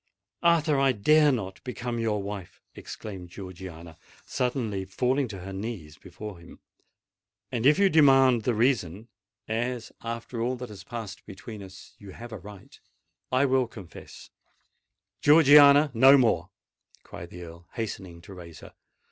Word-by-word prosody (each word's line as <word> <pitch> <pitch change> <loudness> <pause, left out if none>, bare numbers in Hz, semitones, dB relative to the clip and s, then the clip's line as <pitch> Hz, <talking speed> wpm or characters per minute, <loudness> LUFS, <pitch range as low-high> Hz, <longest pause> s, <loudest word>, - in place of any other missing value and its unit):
"Arthur, 160 -4 +3
I 135 -1 +3
dare 150 +7 +4
not 95 -7 -4
become 120 -2 -5
your 105 -3 -1
wife!" 100 -2 -8
exclaimed 95 -5 -9
Georgiana, 85 -3 -10 0.3
suddenly 120 -6 -2
falling 125 +8 0
upon 100 -5 -8
her 95 +2 -8
knees 95 -7 -7
before 95 +1 -10
him; 85 - -15 0.9
"and 120 +1 +1
if 150 - +5
you 200 0 +4
demand 135 -7 +5
the 120 +1 -1
reason—as, 110 +1 -3
after 115 0 -5
all 125 +2 -1
that 125 -1 -8
has 100 -3 -11
passed 110 -3 -8
between 105 +1 -10
us, 95 0 -13
you 100 -2 -12
have 120 0 -10
a 110 - -7
right—I 100 - -6
will 130 -2 +2
confess——" 95 -8 -13 0.9
"Georgiana, 145 -1 +7
no 135 +4 +7
more!" 110 -10 +1 0.5
cried 85 +1 -10
the 90 0 -10
Earl, 85 0 -13
hastening 95 -7 -6
to 95 - -12
raise 85 -3 -12
her. - - -13
110 Hz, 140 wpm, -26 LUFS, 95-130 Hz, 0.9 s, Georgiana